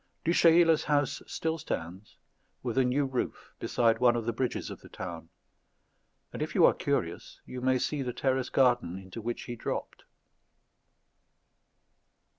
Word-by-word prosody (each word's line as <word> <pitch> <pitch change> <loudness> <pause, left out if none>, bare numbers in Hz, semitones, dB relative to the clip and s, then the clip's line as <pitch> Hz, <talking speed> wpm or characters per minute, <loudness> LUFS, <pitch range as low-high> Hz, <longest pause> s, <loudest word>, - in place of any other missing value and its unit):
Du 165 - +3
Chayla's 165 -2 +5
house 145 -2 +1
still 160 0 -2
stands, 90 - -6 0.5
with 120 -3 -2
a 130 - +4
new 130 +3 +1
roof, 130 -2 -4
beside 115 -1 +2
one 120 -1 +5
of 115 -2 -2
the 115 - -1
bridges 125 +2 -2
of - - -9
the - - -14
town; 85 -3 -7 1.0
and - - -5
if - - -3
you - - +7
are - - +6
curious - - -2
you 125 - -7
may 130 0 +3
see 145 +3 -1
the 125 -2 -2
terrace 130 +1 0
garden 120 -9 +2
into 95 +3 -8
which 120 +2 -4
he 120 - -6
dropped. 115 - -5
125 Hz, 155 wpm, -29 LUFS, 115-135 Hz, 1.0 s, you